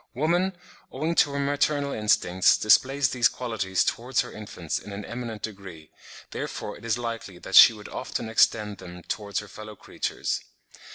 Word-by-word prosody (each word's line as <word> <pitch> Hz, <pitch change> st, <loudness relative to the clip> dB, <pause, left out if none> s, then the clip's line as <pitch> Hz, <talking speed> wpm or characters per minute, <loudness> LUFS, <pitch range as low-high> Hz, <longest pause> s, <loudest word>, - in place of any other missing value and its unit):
Woman, 175 Hz, +6 st, +1 dB, 0.3 s
owing 155 Hz, +5 st, -2 dB
to 145 Hz, -, +3 dB
her -, -, -2 dB
maternal 145 Hz, 0 st, 0 dB
instincts, 95 Hz, -5 st, +3 dB
displays 135 Hz, +5 st, +3 dB
these 120 Hz, -2 st, +3 dB
qualities 110 Hz, -7 st, -1 dB
towards 120 Hz, +2 st, 0 dB
her -, -, -8 dB
infants 95 Hz, -6 st, -5 dB
in 105 Hz, -, -10 dB
an 100 Hz, 0 st, -6 dB
eminent 115 Hz, -3 st, -6 dB
degree; 95 Hz, -7 st, -8 dB, 0.4 s
therefore -, -, -5 dB
it -, -, -13 dB
is 115 Hz, 0 st, 0 dB
likely 115 Hz, -6 st, -5 dB
that 95 Hz, -, -10 dB
she -, -, +10 dB
would 105 Hz, -2 st, -10 dB
often 115 Hz, -, -5 dB
extend 105 Hz, -2 st, +2 dB
them 90 Hz, -1 st, -10 dB
towards 100 Hz, -2 st, -4 dB
her 105 Hz, -, -12 dB
fellow 110 Hz, +1 st, -10 dB
creatures. -, -, -4 dB
110 Hz, 165 wpm, -26 LUFS, 100-130 Hz, 0.4 s, she